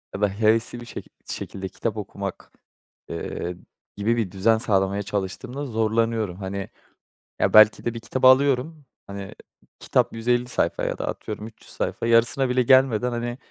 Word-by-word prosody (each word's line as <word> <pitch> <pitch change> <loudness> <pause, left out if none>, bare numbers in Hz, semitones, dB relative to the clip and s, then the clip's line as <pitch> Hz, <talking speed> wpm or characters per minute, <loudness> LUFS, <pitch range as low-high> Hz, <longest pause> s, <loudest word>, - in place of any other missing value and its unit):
ya 100 - -5
da 105 - +3
hevesli 110 +3 +1
bir - - -9
şekil - - -9
şekilde 95 0 -5
kitap 110 +4 -4
okumak, 100 -1 -6 0.6
eee, 85 +1 -5 0.4
gibi 115 +3 +1
bir 105 -6 -1
düzen 110 +4 +3
sağlamaya 100 -2 +1
çalıştığımda 105 +7 -4
zorlanıyorum. 110 -4 0
Hani, 100 0 -5 0.7
ya, - - +1
belki 110 0 +7
de 120 - -1
bir 115 - -6
kitabı 130 +3 +2
alıyorum, 140 +3 +3 0.2
hani, 100 0 -8 0.4
kitap - - +1
150 120 +2 0
sayfa - - 0
ya - - -2
da - - -4
atıyorum 105 0 -5
300 115 - -16
sayfa, - - -3
yarısına 120 +3 +3
bile 125 0 +2
gelmeden, 125 -2 +4
hani, 120 +1 -3
115 Hz, 155 wpm, -24 LUFS, 100-120 Hz, 0.7 s, belki